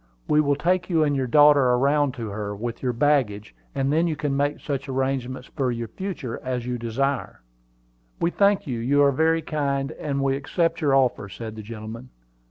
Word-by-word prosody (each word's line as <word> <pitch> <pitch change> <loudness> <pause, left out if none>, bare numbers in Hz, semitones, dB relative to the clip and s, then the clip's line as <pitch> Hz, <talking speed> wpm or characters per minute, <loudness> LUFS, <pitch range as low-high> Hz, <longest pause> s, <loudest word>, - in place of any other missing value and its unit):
"We 150 0 +4
will 145 -1 +2
take 175 +6 0
you 165 -3 +3
and 145 -1 +1
your 130 -2 -1
daughter 145 +3 +6
around 135 +2 +2
to 115 -3 -5
her, 105 0 -4
with 115 +3 -5
your 125 - 0
baggage; 120 - +1 0.2
and 135 +1 0
then 165 +2 +2
you 160 - -1
can 140 0 -2
make 145 +1 0
such 140 -1 -4
arrangements 130 -1 -2
for 130 -4 0
the 120 -1 -3
future 155 - -5
as 125 -2 -3
you 125 -1 -3
desire." 130 +4 -2 0.8
"We 170 - +1
thank 200 +1 +2
you; 125 -6 -3
you 140 +5 +3
are 140 - +5
very 160 +3 +2
kind, 140 -2 -1
and 140 -2 -2
we 135 0 +2
accept 165 +5 -1
your 140 -3 +3
offer," 125 -6 +1
said 110 +2 -7
the 110 - -7
gentleman. 110 +3 -8
135 Hz, 195 wpm, -24 LUFS, 120-150 Hz, 0.8 s, daughter